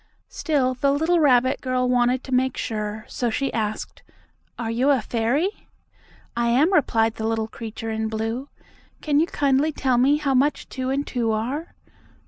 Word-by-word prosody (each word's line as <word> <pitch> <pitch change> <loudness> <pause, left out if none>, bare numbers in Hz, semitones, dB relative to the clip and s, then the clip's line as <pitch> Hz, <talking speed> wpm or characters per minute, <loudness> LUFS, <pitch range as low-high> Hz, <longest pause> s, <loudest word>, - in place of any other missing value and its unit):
Still, 275 -5 0
the 275 +2 +1
little 320 +5 +2
rabbit 260 -3 +3
girl 255 -1 0
wanted 250 +1 +2
to 265 - -9
make 260 0 +1
sure, 215 -1 -4
so 245 - -2
she 275 +5 -2
asked: 215 -1 -3 0.6
"Are 225 -1 -3
you 250 +5 +1
a 275 -2 +4
fairy?" 250 - -1 0.7
"I 235 0 +1
am," 280 +11 +3
replied 225 -9 +2
the 220 - -2
little 225 -1 -1
creature 225 0 -6
in 220 0 -2
blue. 225 +5 -3 0.5
"Can 295 -1 +2
you 325 - +2
kindly 285 +1 +1
tell 260 -4 +1
me 280 +4 +4
how 285 -2 0
much 275 +3 +1
two 260 0 -3
and 280 +2 -1
two 235 -3 -1
are?" 260 +10 -3
255 Hz, 170 wpm, -23 LUFS, 225-280 Hz, 0.7 s, a